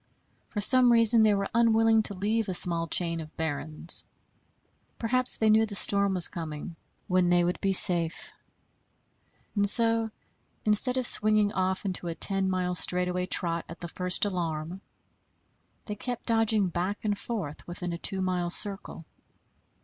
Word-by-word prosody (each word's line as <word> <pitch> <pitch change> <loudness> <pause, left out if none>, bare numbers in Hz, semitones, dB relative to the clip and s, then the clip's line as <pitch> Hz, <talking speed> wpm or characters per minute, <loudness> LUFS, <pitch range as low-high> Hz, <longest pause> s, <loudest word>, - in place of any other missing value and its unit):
For 210 - -5
some 250 +3 +6
reason 230 -1 +5
they 215 -1 +2
were 200 0 -3
unwilling 225 -1 +2
to 210 -2 -2
leave 215 +2 -3
a 185 - -3
small 170 -1 -2
chain 170 -1 -1
of 155 0 -14
barrens. 160 +1 -4 0.9
Perhaps 255 +2 0
they 220 - -1
knew 220 +1 +3
the 205 - -7
storm 200 -1 +2
was 175 -2 +5
coming, 160 +1 -8 0.3
when 180 -1 0
they 175 0 +2
would 175 +1 -4
be 195 - -1
safe; 175 -3 +2 1.2
and 205 -1 +5
so, 230 0 +5 0.6
instead 220 +5 +3
of 255 - +2
swinging 215 -2 +4
off 185 +1 -3
into 180 -2 -3
a 165 - -5
ten 195 +1 -1
mile 180 -1 -3
straightaway 180 +1 -1
trot 170 -2 -1
at 165 - -11
the 170 - -8
first 180 +4 -1
alarm, 170 -2 -5 1.0
they 210 - -6
kept 245 +3 -7
dodging 225 -4 +1
back 185 +5 -5
and 205 -1 -1
forth 190 -11 -7
within 175 0 -7
a 170 - -7
two 190 0 -2
mile 180 -2 -3
circle. 195 -3 -6
190 Hz, 155 wpm, -26 LUFS, 175-215 Hz, 1.2 s, some